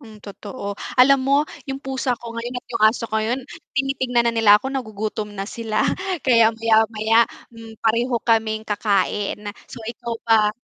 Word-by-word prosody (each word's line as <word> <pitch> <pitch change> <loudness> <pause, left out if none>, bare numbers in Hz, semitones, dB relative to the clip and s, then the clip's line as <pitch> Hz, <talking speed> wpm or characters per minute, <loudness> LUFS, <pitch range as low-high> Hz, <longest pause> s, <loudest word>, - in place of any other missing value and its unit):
Hmm, 220 -5 -13
totoo. 200 +1 -7 0.2
Alam 275 +2 +7
mo 275 +1 +3 0.3
yung 270 - -4
pusa 265 -2 -2
ko 230 -1 -9
ngayon 240 +2 -5
at - - -21
yung 230 -2 -2
aso 225 +2 +3
ko 220 - -7
ngayon 225 +4 0 0.4
tinitignan 260 -3 +1
na 235 - +2
nila 210 -2 +6
ako 260 - -7
nagugutom 215 -4 -4
na 195 -1 -5
sila 225 0 -1 0.4
kaya 230 -3 +6
maya-maya, 225 0 +3 0.3
hmm, 225 -1 -12
pareho 235 +3 +1
kaming 220 -1 +1
kakain. 205 -1 0 0.3
So, - - -9
ikaw 235 0 -5
ba? 220 -2 +4
225 Hz, 165 wpm, -22 LUFS, 215-245 Hz, 0.4 s, Alam